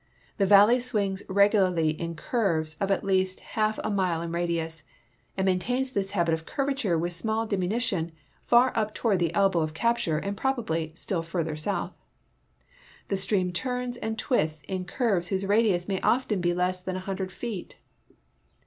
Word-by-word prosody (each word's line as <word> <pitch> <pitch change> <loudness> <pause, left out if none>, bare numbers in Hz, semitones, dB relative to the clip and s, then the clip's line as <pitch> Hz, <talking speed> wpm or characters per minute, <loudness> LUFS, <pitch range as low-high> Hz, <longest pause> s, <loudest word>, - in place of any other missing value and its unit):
The 195 - +3
valley 205 +5 +7
swings 205 -6 -1
regularly 190 -5 +3
in 170 +2 -5
curves 165 - 0
of 195 -1 0
at 195 - +1
least 190 -1 +1
half 215 0 -1
a - - -1
mile 180 -4 0
in 170 - -4
radius, 165 -2 -2 0.6
and 190 - +1
maintains 245 +8 0
this 195 -4 -1
habit 170 -5 +1
of 160 0 -2
curvature 270 - -1
with 175 +2 -2
small 220 +6 0
diminution 195 -3 -1 0.4
far 245 +2 +5
up 215 -1 -1
toward 210 -6 +1
the 170 -2 +1
elbow 195 -3 +3
of 155 -1 -2
capture 230 -6 +1
and 200 +6 -3
probably 200 - -1
still 175 0 -1
further 165 -2 -3
south. 175 +6 -2 1.2
The 195 - 0
stream 190 -2 +1
turns 250 +4 -2
and 220 -1 -3
twists 155 - 0
in 185 -1 -4
curves 195 -5 0
whose 195 0 -1
radius 200 -4 +2
may 195 -2 -1
often 230 -6 +1
be 175 0 +1
less 180 +1 0
than 185 0 -4
a - - -2
hundred 190 -1 -3
feet. 220 -3 -6
190 Hz, 165 wpm, -27 LUFS, 170-220 Hz, 1.2 s, valley